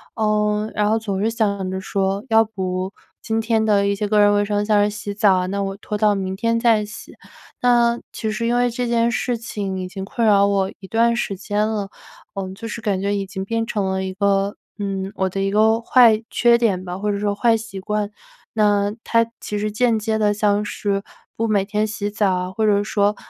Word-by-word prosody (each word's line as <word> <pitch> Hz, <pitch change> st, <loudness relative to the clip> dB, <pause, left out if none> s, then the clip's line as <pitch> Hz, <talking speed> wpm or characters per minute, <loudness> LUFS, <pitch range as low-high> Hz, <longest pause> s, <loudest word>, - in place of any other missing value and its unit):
呃， 210 Hz, -1 st, +1 dB
然 210 Hz, 0 st, +2 dB
后 220 Hz, +1 st, +2 dB
总 200 Hz, -3 st, -3 dB
是 220 Hz, -, +2 dB
想 200 Hz, -4 st, -1 dB
着 190 Hz, 0 st, -3 dB
说 195 Hz, +1 st, -1 dB
要 225 Hz, 0 st, +5 dB
不 190 Hz, -2 st, -4 dB, 0.3 s
今 225 Hz, 0 st, -1 dB
天 220 Hz, -1 st, +1 dB
的 200 Hz, -2 st, +3 dB
一 200 Hz, -, +1 dB
些 210 Hz, +1 st, -2 dB
个 210 Hz, 0 st, +2 dB
人 205 Hz, 0 st, +6 dB
卫 205 Hz, 0 st, +2 dB
生， 205 Hz, 0 st, 0 dB
像 210 Hz, -1 st, +3 dB
是 205 Hz, -, +2 dB
洗 210 Hz, -1 st, -5 dB
澡 205 Hz, -1 st, +4 dB
啊， 180 Hz, -, 0 dB
那 200 Hz, +1 st, -2 dB
我 195 Hz, 0 st, -3 dB
拖 210 Hz, -, -4 dB
到 210 Hz, 0 st, +3 dB
明 190 Hz, -1 st, -3 dB
天 230 Hz, +3 st, 0 dB
再 225 Hz, -3 st, +3 dB
洗。 215 Hz, -, -11 dB, 0.5 s
那 240 Hz, -1 st, +3 dB
其 220 Hz, -, -3 dB
实 215 Hz, +2 st, -2 dB
因 235 Hz, +1 st, +1 dB
为 245 Hz, 0 st, +2 dB
这 245 Hz, +1 st, -3 dB
件 235 Hz, 0 st, +2 dB
事 245 Hz, +1 st, -1 dB
情 200 Hz, -4 st, -4 dB
已 185 Hz, -, -4 dB
经 190 Hz, +1 st, -6 dB
困 230 Hz, +2 st, -1 dB
扰 200 Hz, -1 st, +5 dB
我 195 Hz, -1 st, +1 dB
一 195 Hz, -, -11 dB
段 235 Hz, +3 st, +2 dB
时 205 Hz, -4 st, -2 dB
间 205 Hz, +2 st, -1 dB
了， 210 Hz, -3 st, -3 dB, 0.5 s
嗯， 190 Hz, -1 st, -4 dB
就 225 Hz, +4 st, -8 dB
是 225 Hz, -, -5 dB
感 200 Hz, -4 st, -1 dB
觉 200 Hz, +1 st, 0 dB
已 200 Hz, -1 st, -2 dB
经 190 Hz, 0 st, -5 dB
变 225 Hz, +3 st, -1 dB
成 210 Hz, -4 st, -2 dB
了 190 Hz, 0 st, -1 dB
一 190 Hz, 0 st, -4 dB
个 200 Hz, +1 st, +1 dB, 0.2 s
嗯， 195 Hz, -2 st, -3 dB
我 190 Hz, 0 st, 0 dB
的 195 Hz, +1 st, -3 dB
一 195 Hz, -, +1 dB
个 220 Hz, +3 st, +3 dB
坏 230 Hz, -2 st, +5 dB
缺 235 Hz, -1 st, +4 dB
点 200 Hz, -6 st, +1 dB
吧， 180 Hz, 0 st, -5 dB
或 210 Hz, +1 st, -1 dB
者 200 Hz, -, -1 dB
说 205 Hz, 0 st, 0 dB
坏 225 Hz, +2 st, +3 dB
习 220 Hz, -3 st, -8 dB
惯， 210 Hz, +1 st, -2 dB, 0.4 s
那 205 Hz, -1 st, +2 dB
它 230 Hz, 0 st, +2 dB
其 210 Hz, -, -4 dB
实 210 Hz, +1 st, -2 dB
间 230 Hz, +1 st, +2 dB
接 220 Hz, 0 st, -1 dB
地 210 Hz, -1 st, +3 dB
像 205 Hz, 0 st, +1 dB
是 200 Hz, -1 st, -2 dB, 0.3 s
不 230 Hz, -, -1 dB
每 205 Hz, -3 st, +1 dB
天 210 Hz, +1 st, 0 dB
洗 210 Hz, -1 st, -3 dB
澡 205 Hz, -2 st, +1 dB
啊， 180 Hz, 0 st, -2 dB
或 220 Hz, +3 st, -1 dB
者 205 Hz, -1 st, +3 dB
说 205 Hz, 0 st, +1 dB
210 Hz, 245 characters per minute, -21 LUFS, 195-220 Hz, 0.5 s, 人